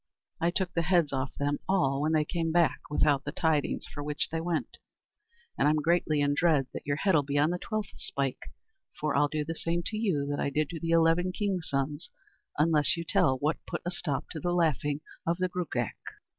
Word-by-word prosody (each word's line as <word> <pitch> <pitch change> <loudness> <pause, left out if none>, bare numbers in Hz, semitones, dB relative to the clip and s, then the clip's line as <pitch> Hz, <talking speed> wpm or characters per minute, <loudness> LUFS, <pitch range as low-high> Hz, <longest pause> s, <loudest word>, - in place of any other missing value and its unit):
I 170 - +2
took 180 +1 -1
the 170 - +1
heads 170 -4 +2
off 135 0 -2
them 145 0 -1
all 140 -8 +2
when 155 +2 +1
they 155 -1 +3
came 165 0 -1
back 170 -1 +3
without 145 -1 +2
the 145 - -4
tidings 160 -2 0
for 145 - -7
which 150 0 -1
they 165 0 -1
went, 170 -1 -2 0.8
and - - +4
I'm 150 - +4
greatly 155 -1 +2
in 145 0 +2
dread 150 -3 +3
that - - -7
your 145 - +1
head'll 165 -1 +3
be 140 +1 -2
on 150 +3 +3
the 180 - -2
twelfth 215 -1 -3
spike, 135 -2 -3 0.5
for 150 -1 0
I'll 145 - +4
do 150 +1 -2
the 165 - -3
same 170 +1 -1
to 215 - -3
you 185 -11 0
that 145 - -2
I - - 0
did 150 +1 0
to 165 - -5
the 165 - -3
eleven 165 +2 +3
kings' 185 -3 -2
sons 140 +3 -2 0.5
unless 150 +1 +3
you 170 - -3
tell 130 0 +3
what 150 +4 -1
put - - -4
a 175 - -1
stop 160 -6 -2
to 160 - -5
the 175 +4 -1
laughing 150 -4 +1 0.3
of 170 +1 +1
the 185 0 0
Gruagach." 155 -10 -3
155 Hz, 215 wpm, -29 LUFS, 145-175 Hz, 0.8 s, and